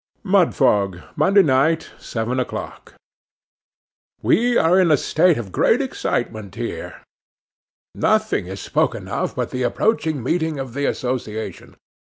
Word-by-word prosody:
'Mudfog, 105 - +2 0.2
Monday 200 +1 +4
night, 150 +3 +2
seven 120 +3 -3
o'clock. 125 - -6 1.3
'WE 240 +1 +3
are 175 +3 +4
in 180 -3 +4
a 150 - +5
state 170 +4 +2
of 105 -5 -6
great 235 - +3
excitement 110 - -3
here. 120 0 -6 0.9
Nothing - - +1
is 95 +1 -7
spoken - - -1
of, - - -3
but - - -3
the 130 - -3
approaching 155 - 0
meeting 160 +2 -1
of 135 -3 -6
the 140 +1 -1
association. 120 -4 -4
135 Hz, 125 wpm, -21 LUFS, 115-175 Hz, 1.3 s, a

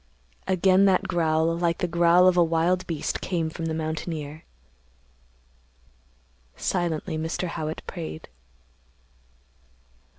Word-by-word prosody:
Again 190 +1 +4
that 190 0 +3
growl 165 -2 +1
like 170 -1 0
the 180 - -1
growl 175 +1 +4
of 185 - +4
a 175 - +5
wild 170 +3 +1
beast 160 -4 -3
came 165 -3 -2
from 165 0 -5
the 160 - -2
mountaineer. 155 -1 -5 2.1
Silently 165 - -2
Mr. 165 +3 -3
Howitt 160 -1 -4
prayed. 80 0 -7
165 Hz, 105 wpm, -25 LUFS, 160-180 Hz, 2.1 s, a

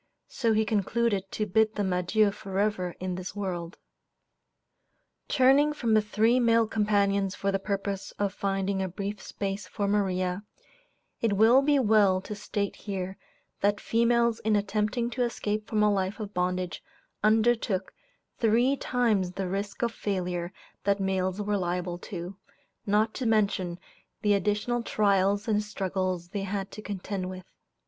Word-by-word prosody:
So 230 -4 +1
he 220 0 +2
concluded 205 -1 0
to 215 - -1
bid 220 +2 +2
them 195 -3 0
adieu 200 +4 +2
forever 195 -2 -2
in 185 0 -3
this 180 +1 -6
world. 180 -4 -4 1.5
Turning 280 +2 +4
from 235 -6 0
the 215 - +5
three 220 +4 +2
male 230 -1 +4
companions 200 -2 +1
for 195 - -1
the 195 - 0
purpose 195 -1 -3
of 200 -1 0
finding 195 -1 -1
a 190 - -1
brief 200 +3 -5
space 195 0 -4
for 205 -2 -2
Maria, 185 -2 0 0.8
it 225 -3 +2
will 225 +6 +6
be 290 +1 +3
well 210 -6 +4
to 210 - -6
state 200 0 -3
here 190 -2 -5 0.4
that 205 +1 +2
females 235 0 +2
in 215 0 +1
attempting 210 +4 0
to 250 - -3
escape 215 -3 -1
from 215 -1 +1
a 210 -1 +4
life 195 +2 -1
of 210 -1 -6
bondage 180 0 -1 0.4
undertook 220 -3 +2 0.5
three 240 +4 +3
times 220 -9 0
the 190 0 -3
risk 200 +4 -3
of 235 - +1
failure 180 -4 -2 0.3
that 200 0 +2
males 190 0 0
were 205 0 0
liable 175 -1 -2
to, 180 -1 -7 0.5
not 215 +2 +2
to 255 - -2
mention 200 -5 +1 0.5
the 210 -1 +4
additional 210 +4 0
trials 200 -2 +2
and 210 -1 +2
struggles 185 -4 -2
they 200 +2 -3
had 195 0 -3
to 215 - -8
contend 195 -2 -4
with. 185 -1 -8
205 Hz, 150 wpm, -28 LUFS, 190-220 Hz, 1.5 s, will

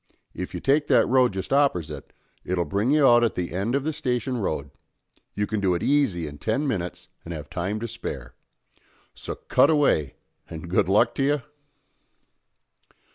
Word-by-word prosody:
If - - -6
you - - -3
take 145 +2 +2
that - - +4
road 130 -1 +4
just 95 0 -5
oppersite, 85 - 0 0.3
it'll 90 -1 -1
bring 100 - 0
you 150 0 +4
out 120 -1 +6
at 115 - +1
the 90 -2 -3
end 100 +8 -1
of 140 - 0
the 155 +2 -2
Station 125 -4 -2
Road; 75 - -3 0.6
you 105 - 0
can 110 0 -2
do 95 -3 +1
it 85 - -3
easy 135 - +2
in 75 -1 -8
ten 135 +7 -1
minnits 90 -9 -3 0.2
and 85 0 -6
have 75 -1 -9
time 95 +4 -2
to 115 - -3
spare. 65 - -7 0.8
So - - -6
cut - - +3
away, 140 - +2 0.3
and 85 +1 -8
good 90 - +2
luck 115 +4 +4
to 135 - -1
you?" 145 0 +1
105 Hz, 180 wpm, -25 LUFS, 85-135 Hz, 0.8 s, out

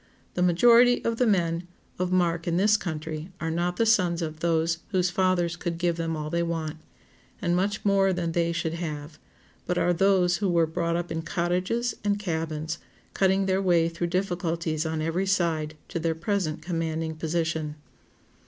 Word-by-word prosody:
The 180 - -2
majority 235 +8 +5
of 230 0 0
the 250 - +3
men 175 -4 +1 0.3
of 180 0 0
mark 170 -2 +1
in 170 0 +1
this 210 +3 +4
country 160 -2 -4
are 160 +1 -2
not 175 +2 -1
the 230 - +3
sons 180 -6 +2
of 155 -1 -5
those 165 0 +1
whose 185 -2 +1
fathers 175 -2 +1
could 175 -1 -4
give 170 -1 +1
them 165 -1 -2
all 150 0 -4
they 170 - +1
want, 165 -2 -2 0.6
and 175 -5 +1
much 200 +4 -1
more 195 -1 +4
than 175 -2 -1
they 170 0 +1
should 165 -1 -2
have, 155 -2 -5 0.5
but 180 - 0
are 175 - +3
those 180 -1 +3
who 200 -1 0
were 170 -2 +3
brought 170 +1 -1
up 175 0 -3
in 160 - -2
cottages 180 +8 -1
and 205 0 +1
cabins, 160 -4 -3 0.3
cutting 190 0 +2
their 190 0 +1
way 175 -3 +3
through 170 +1 -3
difficulties 170 -3 -1
on 160 -1 -2
every 175 +4 -1
side 160 -5 0
to 170 - -3
their 165 0 0
present 170 -3 -2
commanding 165 -2 -2
position. 160 -1 -2
170 Hz, 180 wpm, -26 LUFS, 160-185 Hz, 0.6 s, majority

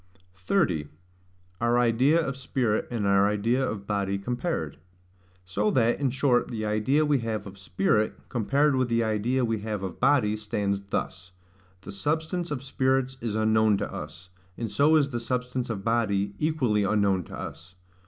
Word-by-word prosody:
30. 90 - 0 0.7
Our 120 +1 +3
idea 125 +7 +3
of 135 -5 -2
Spirit 130 -4 -1
and 115 -4 -2
our 100 0 +4
idea 115 +6 +1
of 105 -6 -3
Body 100 -1 -1
compared. 120 - -3 0.7
So 100 +4 0
that, 120 -1 +2
in 140 -2 +1
short, 130 -1 +2
the 110 -3 -4
idea 110 +9 +2
we 145 -2 +2
have 110 -3 -3
of 95 0 -10
spirit, 95 +3 +1
compared 140 +5 +1
with 130 -1 +1
the 115 0 +2
idea 115 +4 0
we 115 -2 -1
have 105 -2 -4
of 95 -3 -6
body, 125 -6 +3
stands 100 -2 -2
thus: 90 -1 -4 0.5
the 95 - -9
substance 160 - -2
of 140 -3 -4
spirits 130 -1 0
is 115 -2 -3
unknown 110 -1 +3
to - - -4
us; 80 +4 -8 0.3
and 115 -3 -4
so 150 +3 +4
is 140 -3 +3
the 120 - -2
substance 125 +1 -3
of 100 -4 -4
body 100 -3 0
equally 130 -10 +1
unknown 100 -2 +2
to - - -9
us. 90 +3 -9
115 Hz, 165 wpm, -27 LUFS, 100-130 Hz, 0.7 s, our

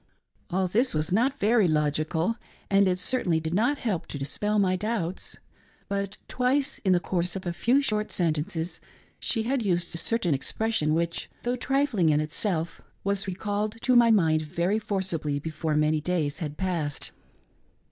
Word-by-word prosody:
All 190 0 +1
this 230 +3 +1
was 155 +3 +1
not 260 +7 +2
very 215 -2 +4
logical, 155 +5 +1 0.4
and 195 0 +5
it 180 -1 +1
certainly 180 -4 +1
did 160 +1 -3
not 240 +9 +2
help 210 -11 -2
to - - -6
dispel 205 +10 -1
my 190 -2 +3
doubts. 190 -3 -3 0.5
But, 200 0 -3
twice 260 +3 +1
in 190 - +1
the 175 - +4
course 175 0 -1
of 190 - -5
a 175 - -1
few 255 +10 +2
short 215 -4 -1
sentences, 165 +1 -1 0.4
she 225 -3 0
had 255 +1 0
used 175 -3 0
a 165 - -2
certain 205 -8 +1
expression 155 +3 0
which, 170 0 -2
though 245 +1 0
trifling 255 - +1
in 150 -1 +3
itself, 160 +2 -2 0.2
was 200 0 0
recalled 205 +3 -2
to 255 0 +3
my 240 -1 +7
mind 165 -8 +4
very 170 +7 0
forcibly 175 -9 -2
befon 155 0 -2
many 155 0 +2
days 155 -3 -1
had 150 -2 -5
passed. 170 -6 -2
185 Hz, 165 wpm, -27 LUFS, 160-220 Hz, 0.5 s, my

